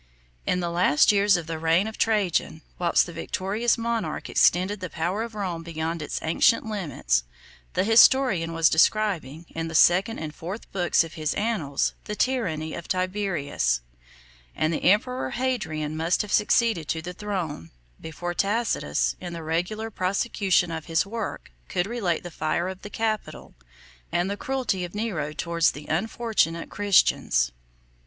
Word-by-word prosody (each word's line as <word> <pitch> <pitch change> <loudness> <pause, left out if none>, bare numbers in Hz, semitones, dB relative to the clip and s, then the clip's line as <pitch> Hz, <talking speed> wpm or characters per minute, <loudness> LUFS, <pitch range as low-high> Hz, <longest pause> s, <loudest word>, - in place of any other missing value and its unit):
In 180 - +1
the 170 -1 -2
last 170 -2 +4
years 200 -1 +4
of 170 - -5
the 165 -1 -4
reign 165 +4 +3
of 220 0 -5
Trajan, 195 -7 0 0.2
whilst 175 -1 +3
the 175 - -9
victorious 195 +7 -1
monarch 230 -1 -3
extended 190 +3 +3
the 185 -1 -5
power 175 +7 -2
of 230 -1 -5
Rome 185 -5 -3
beyond 165 0 -4
its 150 - -4
ancient 170 +9 +3
limits, 155 - -1 0.5
the - - +1
historian 225 -5 +5
was 165 -1 +3
describing, 170 -4 +1
in 165 0 -4
the 160 - -6
second 185 +7 +4
and 155 -1 -5
fourth 185 +8 -7
books 180 -3 +2
of 165 - -9
his 155 -3 -2
annals, 200 -11 0
the 210 - -4
tyranny 175 -12 -1
of 170 - -7
Tiberius; 185 - -1 0.7
39 - - -2
and 160 - +1
the - - -3
emperor 250 +6 +1
Hadrian 160 -13 -2
must 165 +5 +1
have 210 - -6
succeeded 210 -6 +2
to 160 0 -2
the 180 +1 -6
throne, 175 - -4 0.3
before 175 +2 -5
Tacitus, 185 - 0
in 175 -1 -6
the 165 -1 -6
regular 180 +8 -2
prosecution 190 -2 +1
of 160 -1 -5
his 165 +2 +1
work, 220 - -5 0.2
could 180 - 0
relate 200 -7 -1
the 175 - -7
fire 160 +3 -1
of 190 0 -8
the 205 - -8
capital, 220 -1 -3 0.6
and 175 +3 0
the - - -1
cruelty 245 -5 -2
of 175 +2 -7
Nero 190 -9 -2
towards 170 +2 +1
the 145 +1 -9
unfortunate 175 -2 -1
Christians. 180 - +3
180 Hz, 160 wpm, -25 LUFS, 160-210 Hz, 0.7 s, historian